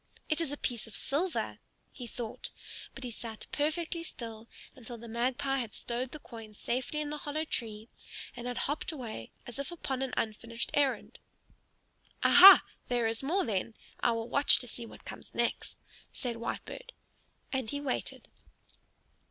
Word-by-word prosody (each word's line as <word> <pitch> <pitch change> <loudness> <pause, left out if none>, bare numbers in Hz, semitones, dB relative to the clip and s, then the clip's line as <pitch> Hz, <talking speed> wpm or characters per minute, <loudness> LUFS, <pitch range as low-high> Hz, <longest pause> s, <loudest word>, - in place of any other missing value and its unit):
"It 310 +1 +2
is 325 - -1
a 290 - -3
piece 240 -4 -1
of 215 - -10
silver!" 330 +6 -1 0.3
he 245 - -8
thought, 230 -1 -5 0.5
but 270 - -7
he 245 - -3
sat 225 -1 -6
perfectly 320 +3 0
still 230 -8 -7 0.3
until 240 -1 -8
the 235 +1 -9
Magpie 260 +4 +1
had 230 -4 -4
stowed 245 +2 -2
the - - -5
coin 225 -6 -10
safely 255 +7 -1
in 295 -1 -2
the 300 - -2
hollow 305 +2 -2
tree 220 -6 -2 0.5
and 245 0 -5
had 245 - -3
hopped 295 +4 -1
away 235 - -6 0.2
as 245 +3 -7
if 280 - -2
upon 270 -6 -3
an 265 -1 -2
unfinished 230 +2 -1
errand. 280 -2 +1 1.0
"Aha! 380 +2 +11 0.2
there 240 -2 +2
is 225 0 +1
more 340 +9 +1
then. 220 0 -1 0.2
I 235 - +3
will 230 0 -2
watch 280 +3 +7
to 250 - -3
see 235 0 -5
what - - -13
comes - - -9
next," - - -1 0.3
said 245 -3 -3
Whitebird. - - -5 0.6
And 260 -4 0
he 285 - -2
waited. 280 -3 -2
250 Hz, 165 wpm, -32 LUFS, 230-290 Hz, 1.0 s, Aha